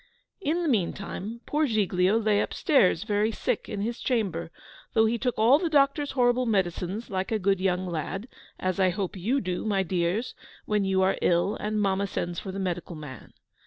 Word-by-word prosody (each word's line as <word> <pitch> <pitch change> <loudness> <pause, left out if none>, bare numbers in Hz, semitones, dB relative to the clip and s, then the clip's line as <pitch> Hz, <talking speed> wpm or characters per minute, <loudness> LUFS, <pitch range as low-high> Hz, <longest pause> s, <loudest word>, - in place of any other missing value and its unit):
In 345 -1 0
the - - 0
meanwhile 210 - -2
poor 300 +1 +1
Giglio 200 -3 +2
lay 215 -2 +2
upstairs 195 - +2
very 210 0 +1
sick - - -2
in 205 -2 -3
his 230 +3 -3
chamber, 190 -10 -1 0.4
though 220 0 +4
he 230 +1 0
took 250 0 -1
all 240 +7 +5
the 340 -1 -1
doctor's 285 -1 +2
horrible 250 -1 +2
medicines 190 +1 -1
like 190 +1 -2
a 220 - +2
good 195 -1 +1
young 185 -1 0
lad: 180 - -4 0.3
as 185 0 -1
I 190 -1 +4
hope 190 +1 -3
you 225 +10 0
do, 180 -4 -3
my 200 -3 +1
dears, 180 +5 -1 0.3
when 210 -1 +1
you 190 -1 +2
are 190 - +1
ill 175 +4 +2
and 215 0 -2
mamma 200 0 +1
sends 175 -2 -3
for 190 - -6
the 190 - -6
medical 175 -2 -3
man. 150 -4 -10
200 Hz, 190 wpm, -27 LUFS, 185-230 Hz, 0.4 s, all